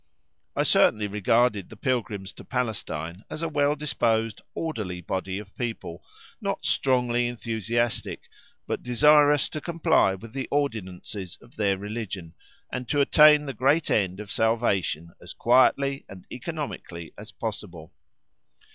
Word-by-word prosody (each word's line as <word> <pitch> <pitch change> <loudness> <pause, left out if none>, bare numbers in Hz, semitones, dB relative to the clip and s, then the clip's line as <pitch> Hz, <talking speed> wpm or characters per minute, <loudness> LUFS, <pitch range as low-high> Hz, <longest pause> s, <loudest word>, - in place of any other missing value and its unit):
I - - +2
certainly 105 -1 +4
regarded 105 0 +2
the - - -11
pilgrims 105 -6 -2
to - - -12
Palestine 100 -8 -3
as 160 - -5
a - - +1
well 145 -1 +2
disposed 115 -7 0
orderly 105 - -3
body 95 +2 -3
of 100 -1 -10
people, 115 -8 -5 0.4
not - - -3
strongly 125 -2 +2
enthusiastic, 115 0 -2 0.4
but - - -3
desirous 145 +3 +5
to 155 - -5
comply 165 - +2
with 110 +4 -12
the 135 -1 -3
ordinances 100 -8 -3
of 120 - -19
their 100 -2 +1
religion, 100 -5 -5 0.4
and 125 -2 -5
to 145 - +1
attain 150 +1 +6
the 135 - -4
great 145 +6 +2
end 95 -2 +1
of 105 -1 -7
salvation 100 -8 0
as - - -9
quietly 135 +3 +3
and 95 -2 -11
economically 85 -1 -6
as 105 +2 -10
possible. 95 -7 -6
115 Hz, 135 wpm, -26 LUFS, 95-135 Hz, 0.4 s, attain